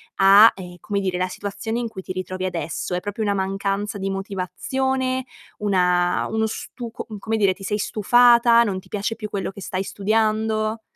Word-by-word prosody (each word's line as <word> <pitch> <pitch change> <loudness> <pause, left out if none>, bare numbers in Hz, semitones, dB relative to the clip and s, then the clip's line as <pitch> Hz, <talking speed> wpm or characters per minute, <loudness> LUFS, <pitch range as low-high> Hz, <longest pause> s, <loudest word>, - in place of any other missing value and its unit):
a, 200 +3 +8
ehm, 180 -2 -9
come 200 +3 -2
dire, 185 -2 -2
la 185 - +1
situazione 205 +4 -4
in 240 -1 -2
cui 220 -4 -8
ti 185 - -6
ritrovi 185 0 -4
adesso? 180 0 -3
È - - 0
proprio 205 +4 -5
una 205 -2 +1
mancanza 195 +1 -2
di 195 0 -2
motivazione? 255 +7 -2 0.3
Una 180 -3 +2
uno 220 0 +1
stu 235 +2 -7
com 220 -2 -8
come 220 +3 -2
dire, 200 -3 +3
ti 195 - -19
sei 210 +2 -1
stufata? 235 +3 +5
Non 195 -4 -2
ti - - -17
piace 210 +2 -2
più 215 -2 -6
quello 200 -1 -3
che 200 +1 -11
stai 185 0 -3
studiando? 215 +2 0
205 Hz, 185 wpm, -22 LUFS, 190-220 Hz, 0.3 s, a